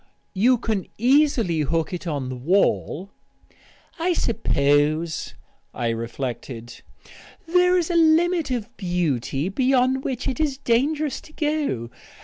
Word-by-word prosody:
"You 245 +6 +4
can 220 -4 -2
easily 245 - +3
hook 160 +3 -1
it 180 - -3
to 155 -5 -3
the 130 - -5
wall 180 +5 0 0.4
" - - -29
"I 360 - +3
suppose," 155 - +1 0.4
I 120 -1 -1
reflected, 120 +1 -5 0.6
"there 360 +2 +3
is 350 0 0
a - - -1
limit 335 0 +3
of 240 -1 -4
beauty 165 - -1
beyond 260 +4 +2
which 255 -1 -3
it 260 - -2
is 295 -4 0
dangerous 285 +4 0
to 310 - -17
go. 295 - -1
225 Hz, 130 wpm, -23 LUFS, -, 0.6 s, You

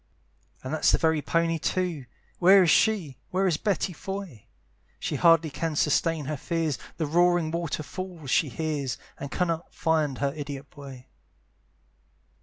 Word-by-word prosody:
And 130 - -4
that's 155 - +3
the - - +4
very 160 -2 +2
pony 165 +1 0
too. 170 -6 -2 0.3
Where 190 +2 +7
is 170 - +4
she, 190 - +2
where 190 +2 +1
is 175 -5 +2
Betty 195 -2 -1
Foy? 190 - -7 0.5
She - - -3
hardly 165 -2 +4
can 160 +2 -3
sustain 155 +1 +1
her 150 +1 -3
fears; 165 -2 -2 0.2
The 160 - -1
roaring 175 +1 +2
water 170 -2 -2
fall 180 -1 -7
she 140 +3 +2
hears, 145 -3 -3 0.2
And 140 - -5
cannot 170 0 -2
find 155 -5 +1
her 140 -1 -1
idiot 140 -2 -7
boy. 135 -3 -11
160 Hz, 150 wpm, -26 LUFS, 145-175 Hz, 0.5 s, Where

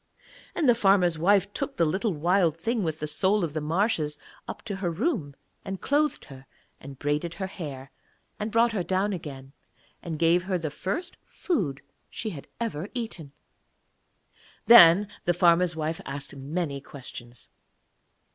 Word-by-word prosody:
And 315 - +1
the 245 - +7
farmer's 195 -7 +3
wife 200 +3 +3
took 275 0 -4
the 170 - +3
little 190 +8 0
Wild 170 0 +2
Thing 225 +7 -1
with 160 -4 -2
the 150 - -4
soul 190 +6 +2
of 160 -4 -2
the 155 - -2
marshes 155 -2 0 0.3
up - - -7
to 205 -4 -4
her 185 -2 -1
room, 165 - -2 0.3
and 190 -1 -5
clothed 295 +1 0
her 135 -1 -13 0.3
and 135 0 -10
braided 150 +5 -2
her 190 - -3
hair, 140 -8 -7 0.5
and 215 +1 -3
brought 230 +2 +3
her 210 -4 -1
down 190 +3 0
again, 140 -6 -8 0.5
and 165 -3 -5
gave 170 +2 +3
her 185 0 -1
the 160 -3 -4
first 255 - -4
food 170 - -2
that - - -41 0.2
she 220 - -5
had 145 -6 -9
ever 210 -6 -3
eaten. 200 - -5 1.3
Then 200 -3 +9 0.2
the 175 - +2
farmer's 175 -1 +4
wife 160 +1 -3
asked 140 +1 -6
many 140 +1 -3
questions. 125 -3 -10
175 Hz, 160 wpm, -27 LUFS, 150-205 Hz, 1.3 s, Then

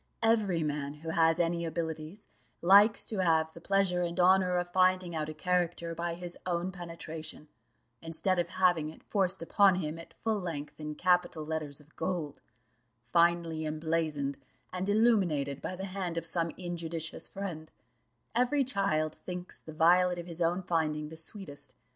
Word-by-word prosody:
Every 210 -7 +2
man 145 -1 -3
who 160 +2 -8
has 165 0 +4
any 170 0 +1
abilities, 160 +3 -4 0.3
likes 205 +5 +6
to 210 -4 -1
have 160 -2 +2
the 170 - -12
pleasure 195 -1 +2
and 175 0 -2
honour 180 0 +4
of 175 0 -3
finding 185 -1 +3
out 155 -1 -2
a - - -5
character 175 0 0
by 170 0 -3
his 175 0 -5
own 175 +1 -1
penetration, 165 -4 -7 0.5
instead 165 +3 +2
of 170 -1 0
having 175 -4 +2
it 155 - -13
forced 190 -3 +1
upon 195 +2 +4
him 165 -2 -3
at 165 - -12
full 220 -2 +1
length 160 -6 -6
in 150 0 -5
capital 175 -2 +1
letters 155 -2 -3
of 150 +1 -20
gold, 170 -6 -3 0.6
finely 170 +3 +2
emblazoned 155 -3 -1 0.3
and 185 +2 -2
illuminated 185 - +2
by 185 - -4
the 190 +1 -5
hand 185 -3 -3
of 165 - -1
some 170 -1 0
injudicious 170 -2 -4
friend: 175 -6 -6 0.6
every 250 +4 +3
child 195 - 0
thinks 180 +1 -6
the 160 - -11
violet 175 +3 +4
of 175 - -5
his 170 -1 -7
own 175 +3 +1
finding 155 -3 -1
the 160 - -9
sweetest. 145 -6 -6
170 Hz, 160 wpm, -31 LUFS, 160-185 Hz, 0.6 s, likes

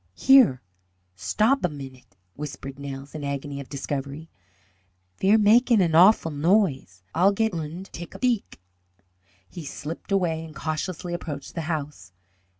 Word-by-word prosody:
"Here, 260 - +5 0.5
stob 220 - +1
a 180 - +2
minute!" 135 -8 -11 0.2
whispered 140 0 -7
Nels, 140 0 -7
in 155 -2 -6
agony 140 0 -4
of 140 - -9
discovery. 140 +2 -5 0.9
"Ve're 200 +3 +5
magin' 225 +2 +5
an 170 -4 +2
awful 175 0 +6
noise. 145 - +1
Ay'll 185 +4 +5
go 225 +3 +1
und 165 +3 -5
take 170 0 -8
a - - -6
beek." 245 -5 -1 0.9
He 170 - -9
slipped 155 +6 -7
away 170 -5 +1
and 160 -2 -11
cautiously 175 +2 -4
approached 145 -5 -6
the 165 - -3
house. 145 - -5
160 Hz, 140 wpm, -25 LUFS, 140-190 Hz, 0.9 s, awful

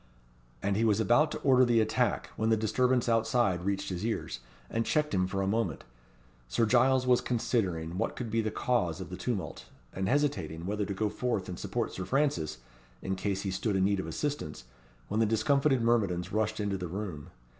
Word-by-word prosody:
And 100 0 +1
he 110 - +1
was 110 -2 +3
about 120 +8 +4
to - - -3
order 130 -2 +5
the 120 -2 +4
attack, 110 - 0
when 110 +1 0
the 110 - +4
disturbance 125 +4 +1
outside 115 -5 +2
reached 100 +1 -1
his 90 0 -4
ears, 110 - -2 0.3
and 115 - -1
checked 150 +2 0
him 95 -1 +2
for 95 +1 -1
a - - -1
moment. 100 -6 -1 0.6
Sir 60 - +1
Giles 130 +3 +4
was 125 -1 +4
considering 90 -8 -1
what 115 - -1
could 120 -3 -5
be 115 +1 +2
the 110 - -1
cause 105 -8 0
of - - -7
the - - -4
tumult, - - -4 0.3
and 95 0 -2
hesitating 140 - 0
whether 105 +1 -1
to 100 - -4
go 110 +2 0
forth 110 -2 -2
and 90 -2 -6
support - - -2
Sir 95 - -4
Francis, 85 - 0 0.5
in 95 - -1
case 95 0 -2
he 95 - -2
stood 100 +2 -1
in 95 0 +3
need 100 0 +1
of 95 - -4
assistance, 140 - -3 0.4
when 105 - -1
the 115 - +3
discomfited 130 +4 +2
myrmidons 100 -6 +1
rushed 110 0 0
into 100 -2 -1
the 90 - -3
room. 90 -5 -5
110 Hz, 200 wpm, -30 LUFS, 95-120 Hz, 0.6 s, order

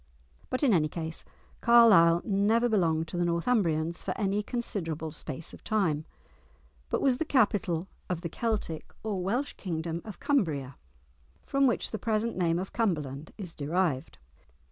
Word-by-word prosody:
But 255 - -1
in 255 -6 +5
any 155 -4 +3
case, 160 0 -5 0.4
Carlisle 205 -8 +6
never 215 +4 +3
belonged 165 -7 +1
to 175 - -5
the 175 - +2
Northumbrians 170 -3 +1
for - - -3
any 200 0 +1
considerable 165 - -3
space 155 +1 -5
of - - -13
time, 165 -8 0 0.8
but - - 0
was 260 -3 +3
the 320 - 0
capital 200 - +1 0.2
of 175 -2 -2
the 170 - -4
Celtic 210 -5 -3
or 205 -4 -2
Welsh 240 +10 -1
kingdom 165 -2 -3
of 210 -5 -9
Cumbria, 155 - 0 0.7
from 275 0 +3
which 240 - 0
the 220 - -3
present 225 +2 0
name 170 -2 +1
of 185 +2 -4
Cumberland 155 - -1
is 185 -6 -7
derived. 155 -2 -1
180 Hz, 150 wpm, -29 LUFS, 160-220 Hz, 0.8 s, Carlisle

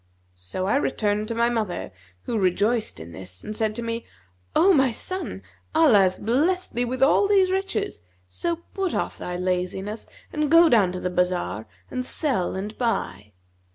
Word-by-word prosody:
So 90 - -5
I 205 +8 +2
returned 210 -6 0
to 230 - -3
my 235 +1 +3
mother, 215 -6 -2 0.3
who 225 - -1
rejoiced 205 +5 +1
in 80 +1 -9
this 90 +1 -10
and 215 - -5
said 215 -1 0
to 235 - -3
me, 230 0 -3 0.5
'O 380 +3 +6
my 270 -5 +4
son, 370 +11 -5 0.3
Allah 305 -10 +6
hath 185 -1 +2
blessed 320 - +1
thee 245 +1 +1
with 255 +2 0
all 400 +8 +5
these 385 -2 +4
riches; 385 - -2 0.3
so 340 - -2 0.2
put 385 -3 -1
off - - -2
thy 180 0 -4
laziness 185 +4 -2 0.3
and 300 -2 0
go 330 +1 +7
down 205 -8 +4
to 180 - -4
the 180 - -2
bazar 180 - -1 0.2
and 255 - -2
sell 250 - -1
and 205 +3 -5
buy.' 105 - -2
220 Hz, 175 wpm, -24 LUFS, 180-280 Hz, 0.5 s, go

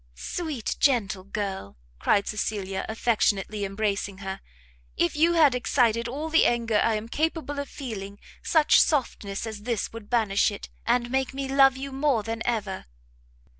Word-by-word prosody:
"Sweet, 300 - -4
gentle 215 -8 +2
girl!" 195 - -5 0.2
cried 200 - +2
Cecilia, 200 -2 -3
affectionately 215 -2 0
embracing 200 -1 -2
her, 195 0 -6 0.6
"if 170 - +1
you 330 +3 +4
had 310 -6 +5
excited 235 -2 +1
all 285 +6 -4
the 325 +1 +4
anger 230 -3 +1
I 230 - +2
am 215 +1 -4
capable 305 +1 -2
of 285 - -4
feeling, 205 -7 -7 0.2
such 310 -2 +5
softness 230 -9 -1
as 220 -2 -6
this 225 -1 -2
would 225 -2 -9
banish 220 -5 +2
it, 205 - -8 0.2
and 240 0 +1
make 265 0 -1
me 275 0 -3
love 270 -1 +5
you 275 +1 -6
more 270 -4 +1
than 225 +1 -4
ever!" 210 -5 -2
230 Hz, 155 wpm, -26 LUFS, 205-270 Hz, 0.6 s, had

